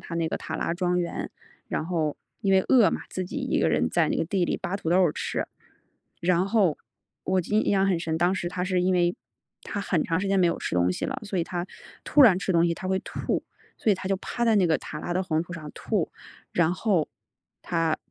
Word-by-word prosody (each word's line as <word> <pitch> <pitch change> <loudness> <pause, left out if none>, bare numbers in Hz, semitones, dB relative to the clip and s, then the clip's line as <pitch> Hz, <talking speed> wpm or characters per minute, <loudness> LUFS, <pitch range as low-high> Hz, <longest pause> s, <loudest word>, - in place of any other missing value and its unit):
她 170 - -7
那 165 -1 0
个 - - -2
塔 - - -6
拉 - - -1
庄 180 0 0
园。 170 -1 -3 0.4
然 - - -2
后 160 -4 -1 0.2
因 195 -1 +1
为 190 - +6
饿 230 -9 +6
嘛， - - -3
自 185 - -3
己 - - -7
一 - - 0
个 - - +3
人 80 +2 +2
在 165 -3 +2
那 - - 0
个 - - 0
地 185 +1 0
里 - - -1
扒 190 +3 -3
土 165 -4 -3
豆 180 - +4
儿 155 - +2
吃。 - - -3 0.7
然 180 +2 +2
后 200 -8 +2 0.5
我 190 -1 +2
就 210 +5 -1
印 - - +2
印 - - +3
象 195 0 +3
很 185 -4 +2
深， 160 -1 -2
当 175 +3 +3
时 175 -2 -2
她 180 0 -3
是 185 -1 +1
因 185 +1 +2
为 175 0 +2 0.5
她 205 - -4
很 175 -5 0
长 165 +1 0
时 200 - -2
间 195 0 +2
没 175 - +5
有 170 - 0
吃 - - -3
东 90 0 +3
西 - - -4
了， - - -3
所 200 -3 -3
以 165 - +1
她 175 -1 -3 0.4
突 295 - +5
然 195 -7 +7
吃 190 0 -1
东 170 0 +4
西， 170 - 0
她 185 +2 -6
会 190 0 +1
吐， - - -3 0.4
所 220 - +2
以 - - +5
她 185 0 -5
就 195 - +1
趴 235 +5 -3
在 225 -2 +4
那 185 -3 +4
个 160 - +3
塔 150 - -7
拉 175 - -3
的 185 - +1
黄 160 -3 0
土 175 - -10
上 155 -3 -7
吐。 - - -1 0.4
然 170 0 +3
后 185 -6 +1 0.5
她 165 -2 0
180 Hz, 275 characters per minute, -26 LUFS, 165-190 Hz, 0.7 s, 然